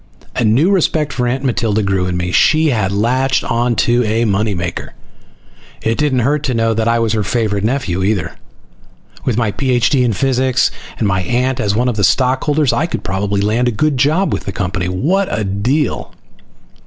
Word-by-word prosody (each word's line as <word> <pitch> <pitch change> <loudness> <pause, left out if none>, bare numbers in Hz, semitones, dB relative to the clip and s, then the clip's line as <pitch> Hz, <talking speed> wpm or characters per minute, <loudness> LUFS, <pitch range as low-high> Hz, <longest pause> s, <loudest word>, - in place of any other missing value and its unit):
A - - 0
new 125 - +3
respect 155 -6 +1
for 125 -1 -1
Aunt 130 +3 -2
Matilda 110 -4 0
grew 95 -2 0
in 90 -1 -2
me. 90 0 -2
She 155 - +3
had 105 -6 0
latched 125 +6 +1
on 120 +1 0
to 120 +1 +2
a 115 +1 0
money 105 0 0
maker! 85 -1 -5 0.9
It 115 +3 -1
didn't 140 -4 +1
hurt 145 +2 +1
to 130 - -1
know 115 0 +1
that 110 0 -1
I 115 0 +2
was 115 -2 0
her 110 - 0
favorite 105 -1 -1
nephew, 110 -7 -1
either. 100 -3 0 0.9
With 120 -4 0
my 115 -4 +1
Ph.D. 130 +2 +1
in 120 -3 +1
physics, 130 +2 +1 0.3
and 110 - 0
my 95 -1 0
aunt 125 +7 -1
as 100 -3 0
one 120 +3 +1
of 120 -3 -1
the 100 - 0
stockholders, 135 - +2
I 165 - 0
could - - -5
probably 100 0 -1
land 110 +5 +1
a - - +2
good 145 +6 0
job 155 +9 +2
with - - -4
the 95 - -3
company. 95 -1 -3
What 165 - 0
a 110 - -2
deal! 115 +9 -1
115 Hz, 195 wpm, -16 LUFS, 100-130 Hz, 0.9 s, new